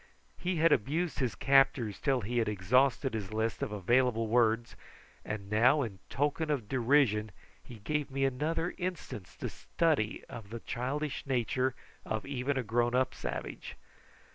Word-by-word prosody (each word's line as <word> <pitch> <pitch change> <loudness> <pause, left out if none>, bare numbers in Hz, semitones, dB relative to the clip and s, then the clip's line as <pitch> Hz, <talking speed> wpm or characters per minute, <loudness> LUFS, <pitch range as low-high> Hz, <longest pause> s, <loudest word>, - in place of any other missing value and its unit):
He 180 0 -1
had 165 0 +4
abused 155 +9 +1
his 130 -4 0
captors 135 -6 +3
till 135 -3 +2
he 120 +4 -1
had 110 -2 +1
exhausted 125 +7 +2
his 105 -3 -4
list 110 +1 -1
of - - -2
available 115 +3 +2
words, 115 0 +2 0.5
and 105 -2 -5
now 125 +8 +4
in 100 -6 -6
token 145 +3 0
of 135 -8 -1
derision 120 -3 +3 0.3
he 120 - -11
gave 150 +7 -2
me 135 0 0
another 155 +6 -1
instance 175 - -5
to - - -3
study 150 -10 0
of 110 -3 -9
the 115 +2 -6
childish 140 +4 -3
nature 130 0 0 0.3
of 110 0 -3
even 140 0 -1
a 130 - 0
grown 120 +2 +1
up 130 +1 +2
savage. - - -5
125 Hz, 155 wpm, -31 LUFS, 110-140 Hz, 0.5 s, had